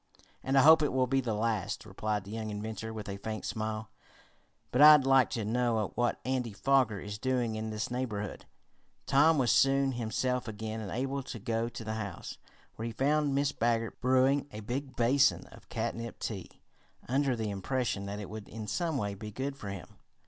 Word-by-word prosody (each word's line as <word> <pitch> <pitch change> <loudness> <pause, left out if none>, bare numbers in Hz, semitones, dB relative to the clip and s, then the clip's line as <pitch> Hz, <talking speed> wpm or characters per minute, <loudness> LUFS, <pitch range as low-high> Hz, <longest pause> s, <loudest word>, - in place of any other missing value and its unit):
"And 135 +1 +1
I 135 - +7
hope 160 +1 +8
it 150 - +1
will 130 0 +2
be 135 +1 +1
the 115 -4 -2
last," 110 -3 -1
replied 105 -2 -2
the 100 - -10
young 110 -1 -4
inventor 110 +2 -5
with 110 -2 -7
a 100 0 -4
faint 110 +2 -5
smile. 110 -1 -3 0.8
"But 125 - +2
I'd 150 -2 +9
like 135 -1 +5
to 110 -3 -3
know 115 -2 0
what 120 0 0
Andy 125 -4 -1
Foger 125 -2 +2
is 105 +2 -6
doing 125 -3 0
in 110 0 -3
this 110 +2 -3
neighborhood." 110 -5 -3 0.6
Tom 150 +4 +5
was 125 -4 +3
soon 135 0 +4
himself 125 +1 -1
again 110 +1 -5
and 105 - -5
able 135 +5 -2
to 125 - -7
go 115 +2 -1
to 115 - -8
the 110 0 -3
house, 110 -3 -6 0.4
where 115 - -3
he - - -4
found 145 +4 +1
Mrs. 140 0 0
Baggert 115 -1 0
brewing 130 +3 +3
a 105 - -7
big 130 +5 -4
basin 135 +4 +3
of - - -16
catnip 115 0 -4
tea, 95 -6 -5 0.6
under 135 0 +1
the 110 -2 -2
impression 100 0 -2
that 100 +1 -5
it 105 - -6
would 110 0 -8
in 110 0 -6
some 165 - -1
way 100 -4 -2
be 105 +2 -7
good 135 +6 -4
for 105 -7 -7
him. 100 -3 -9
115 Hz, 195 wpm, -31 LUFS, 110-135 Hz, 0.8 s, I'd